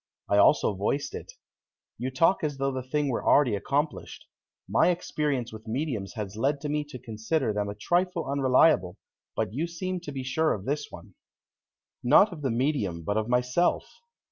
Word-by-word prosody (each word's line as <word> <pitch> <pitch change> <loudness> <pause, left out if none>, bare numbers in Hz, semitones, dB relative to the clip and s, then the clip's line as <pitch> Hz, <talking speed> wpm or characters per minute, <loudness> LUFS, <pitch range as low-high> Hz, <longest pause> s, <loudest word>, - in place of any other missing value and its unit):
I 100 - +3
also 110 +1 +4
voiced 105 +9 -2
it. - - -8 0.7
"You 125 +2 -2
talk 165 +9 +2
as 145 -2 -2
though 135 0 0
the 130 -1 -3
thing 145 +3 -1
were 120 - -2
already 130 -7 +4
accomplished. 145 +9 -2 0.4
My - - +3
experience 150 -8 -2
with 110 +1 -11
mediums 115 -5 -3
has 105 -3 -5
led 140 +6 0
me 150 0 -1
to 145 -3 -9
consider 115 +2 -2
them 105 0 -2
a 100 - -5
trifle 175 - 0
unreliable, 130 - +3 0.4
but 110 -2 -2
you 155 +7 -1
seem 185 +2 -4
to 170 -4 -8
be 135 -2 -5
sure 155 +5 +1
of 100 - -9
this 145 +3 -2
one." - - -12 0.9
"Not 195 - +5
of 155 - -9
the 135 - 0
medium 115 - -1
but 100 +6 -1
of 110 +1 -1
myself. 125 +7 +1
135 Hz, 175 wpm, -27 LUFS, 110-150 Hz, 0.9 s, Not